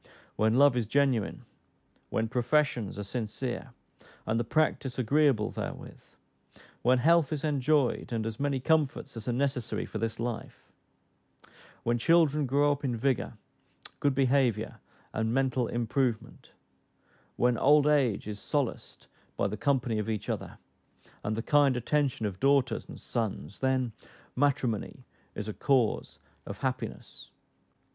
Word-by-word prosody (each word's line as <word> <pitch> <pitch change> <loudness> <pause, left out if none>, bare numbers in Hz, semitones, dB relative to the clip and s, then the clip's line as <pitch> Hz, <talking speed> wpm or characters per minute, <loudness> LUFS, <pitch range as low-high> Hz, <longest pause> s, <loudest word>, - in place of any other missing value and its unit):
When 110 +1 +2
love 140 0 +6
is 120 -4 0
genuine; 130 -4 +1 0.6
when 110 0 0
professions 125 -3 0
are 105 - -3
sincere, 120 +3 -4 0.5
and 110 +1 0
the - - +1
practice 135 -1 0
agreeable 130 -2 +2
therewith; - - -7 0.8
when 125 +2 +4
health 160 +2 +4
is 150 -3 -3
enjoyed, 145 -4 +1
and 115 -2 -1
as 110 0 -4
many 140 -1 0
comforts 140 -1 0
as 115 -2 -7
are - - +1
necessary 130 -2 -1
for 110 - -6
this 115 0 -3
life; 120 -1 -5 1.1
when 120 0 +1
children 150 0 +3
grow 145 +3 +3
up 145 0 -3
in 125 -3 0
vigor, 130 0 0 0.7
good 140 -2 +1
behaviour, 130 -5 +1 0.3
and 110 0 -1
mental 130 -2 +1
improvement; 120 0 -2 0.9
when 125 0 +2
old 145 +1 +5
age 135 -10 +2
is 105 -1 -5
solaced 140 0 -3 0.3
by - - +1
the 105 - -4
company 125 -2 0
of 105 +1 -3
each 110 -2 -3
other, - - -4 0.7
and 105 +1 -1
the 115 - -2
kind 145 -3 +4
attention 135 -2 0
of 95 -3 -4
daughters 135 -4 +2
and - - -9
sons; 100 - -4
then 130 -2 +1 0.4
matrimony 130 -3 0 0.3
is 105 - -5
a 110 - -3
cause 130 -4 +1 0.3
of - - -6
happiness. - - -5
125 Hz, 135 wpm, -29 LUFS, 115-140 Hz, 1.1 s, love